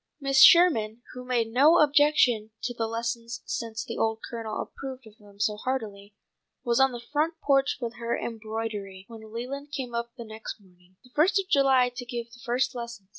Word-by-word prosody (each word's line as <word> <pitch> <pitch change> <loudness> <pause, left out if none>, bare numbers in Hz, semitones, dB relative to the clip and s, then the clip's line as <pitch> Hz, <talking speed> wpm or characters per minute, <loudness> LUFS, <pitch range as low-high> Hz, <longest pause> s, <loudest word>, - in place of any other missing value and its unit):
Mrs. 275 -1 +7
Sherman, 240 -11 +4
who 250 - -8
made 245 -3 0
no 290 +8 +6
objection 290 -7 +4
to 245 - -2
the 230 -1 -2
lessons 230 0 -4
since 225 -1 -4
the - - -6
old 220 0 0
Colonel 225 -2 -5
approved 265 -2 -7
of 220 0 -17
them 205 -1 -18
so 210 0 0
heartily, 210 -5 -4 0.5
was 235 0 +1
on 265 0 +5
the 240 -1 -8
front 315 +3 +1
porch 275 -1 +2
with 240 -1 -5
her 235 0 -2
embroidery 215 -4 -5
when 220 -2 -12
Leland 275 +5 -6
came 260 -4 -5
up 235 0 -3
the 235 - -7
next 220 0 -8
morning, 180 -2 -25
the 250 - -20
first 360 +6 +3
of 385 - -3
July, 270 -5 +4
to 250 - -5
give 235 -1 -6
the 240 +1 -15
first 245 +1 0
lesson. 235 -5 -8
235 Hz, 190 wpm, -27 LUFS, 220-265 Hz, 0.5 s, Mrs